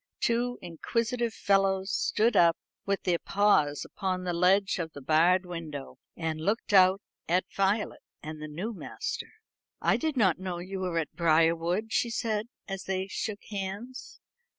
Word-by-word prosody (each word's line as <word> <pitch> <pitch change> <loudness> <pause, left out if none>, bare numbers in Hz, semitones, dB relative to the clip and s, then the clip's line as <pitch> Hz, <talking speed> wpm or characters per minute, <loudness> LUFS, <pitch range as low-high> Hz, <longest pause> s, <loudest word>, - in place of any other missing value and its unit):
Two 240 +1 0
inquisitive 230 +7 -1
fellows 195 -1 +1
stood 225 +1 +2
up 170 -3 +5 0.3
with 200 0 0
their 175 -2 +1
paws 195 -8 +2
upon 185 -2 -3
the 180 -1 -1
ledge 190 +3 +3
of 160 -2 -4
the 145 - -8
barred 170 +6 +3
window, 160 -6 -7 0.2
and 160 -2 -3
looked 205 +4 -1
out 190 +1 +6 0.3
at 180 +2 +2
Violet 200 +2 0 0.2
and 155 0 -7
the 155 - -5
new 180 +10 -4
master. 460 - -5 0.5
"I - - +2
did 315 -3 -2
not 190 -7 +3
know 185 -2 -4
you 185 +2 -5
were 180 -2 -2
at 160 -3 -2
Briarwood," 170 +5 +2
she 235 - +2
said, 225 -2 -1 0.2
as 195 -1 -5
they 190 0 -1
shook 205 +1 -4
hands. 205 +6 -6
190 Hz, 155 wpm, -29 LUFS, 170-210 Hz, 0.5 s, out